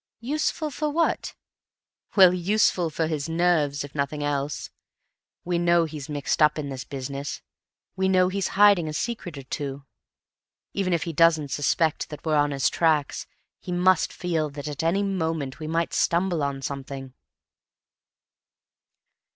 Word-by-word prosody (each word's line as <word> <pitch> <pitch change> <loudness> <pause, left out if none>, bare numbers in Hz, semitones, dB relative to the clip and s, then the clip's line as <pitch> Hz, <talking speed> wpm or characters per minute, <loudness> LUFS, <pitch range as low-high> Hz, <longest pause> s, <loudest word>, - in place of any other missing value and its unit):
"Useful 305 +4 -1
for 300 +2 -2
what?" 330 +3 0 0.8
"Well, 185 -3 +8
useful 180 -1 +2
for 160 +1 -1
his 155 -1 -3
nerves, 160 -4 +1
if 145 - -9
for 150 - -12
nothing 145 +1 -1
else. 145 0 -2 0.7
We 175 -1 0
know 170 -1 +3
he's 150 -2 -7
mixed 145 +1 -1
up 150 0 +5
in 145 -2 -3
this 130 -2 -5
business; 140 +1 -6 0.5
we 190 0 +1
know 185 -1 +4
he's 190 +1 -1
hiding 200 -5 +6
a 155 - -4
secret 180 -5 -4
or 135 - -7
two. 140 +1 -5 0.9
Even 195 -2 -1
if 170 -3 +1
he 170 - -4
doesn't 160 -3 +3
suspect 150 +2 0
that 150 0 -9
we're 155 - +1
on 145 0 +3
his 140 -1 +1
tracks, 155 -4 +1 0.3
he 180 - -7
must 180 0 +3
feel 165 -4 -1
that 145 +1 -7
at 145 -2 -4
any 170 +5 +1
moment 165 -8 -2
we 155 - -5
might 165 +1 -1
stumble 175 -1 +1
on 140 -1 -2
something." 135 -1 -6
160 Hz, 155 wpm, -25 LUFS, 145-180 Hz, 0.9 s, Well